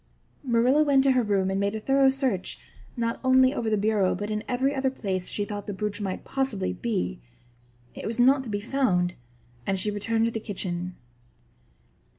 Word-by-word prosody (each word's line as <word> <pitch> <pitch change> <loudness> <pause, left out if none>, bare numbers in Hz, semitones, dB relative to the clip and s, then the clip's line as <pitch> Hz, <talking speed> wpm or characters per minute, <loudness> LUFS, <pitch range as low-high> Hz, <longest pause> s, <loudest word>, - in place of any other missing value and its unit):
Marilla 250 +3 +3
went 280 -3 +4
to 270 - +4
her 255 -1 +3
room 195 -4 +1
and 195 - 0
made 200 +1 0
a - - -2
thorough 270 +4 +4
search, 260 -8 -1 0.4
not 230 0 -1
only 260 0 +5
over 225 - -1
the 215 - +2
bureau 205 -2 +2
but 205 +3 -4
in 215 0 -2
every 265 +3 +1
other 265 -1 +1
place 190 -8 -3
she 205 - -2
thought 205 -1 -6
the 205 - -4
brooch 210 +1 -3
might 190 -2 -3
possibly 265 -8 -1
be. 195 - -2 0.7
It - - -6
was 230 +2 -4
not 265 +3 +5
to - - -6
be 205 -1 -2
found 200 -8 +1 0.5
and 195 - +1
she 210 +3 0
returned 225 +2 0
to 230 - 0
the 225 - -3
kitchen. 180 -4 -4
220 Hz, 190 wpm, -26 LUFS, 200-260 Hz, 0.7 s, only